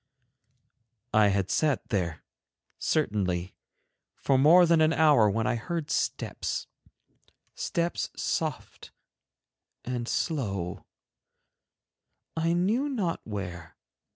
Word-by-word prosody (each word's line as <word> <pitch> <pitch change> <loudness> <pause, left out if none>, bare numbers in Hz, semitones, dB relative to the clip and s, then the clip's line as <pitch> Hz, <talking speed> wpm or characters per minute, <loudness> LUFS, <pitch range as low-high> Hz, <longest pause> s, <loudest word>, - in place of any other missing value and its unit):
I 105 -1 +5
had 100 -1 0
sat 150 -4 0
there, 90 -8 -2 0.6
certainly, 95 - 0 0.6
for 135 - +1
more 160 +7 +7
than 165 -1 +4
an 155 +1 +4
hour 145 -10 +5
when 110 +3 0
I 125 - +1
heard 150 +7 -4
steps, - - -2 0.9
steps 170 0 -2
soft - - -3 1.0
and 120 -1 -3
slow, 100 - -2 1.5
I 165 +1 +1
knew 215 +11 +1
not 200 -11 -2
where. 90 -6 -6
125 Hz, 95 wpm, -28 LUFS, 100-165 Hz, 1.5 s, more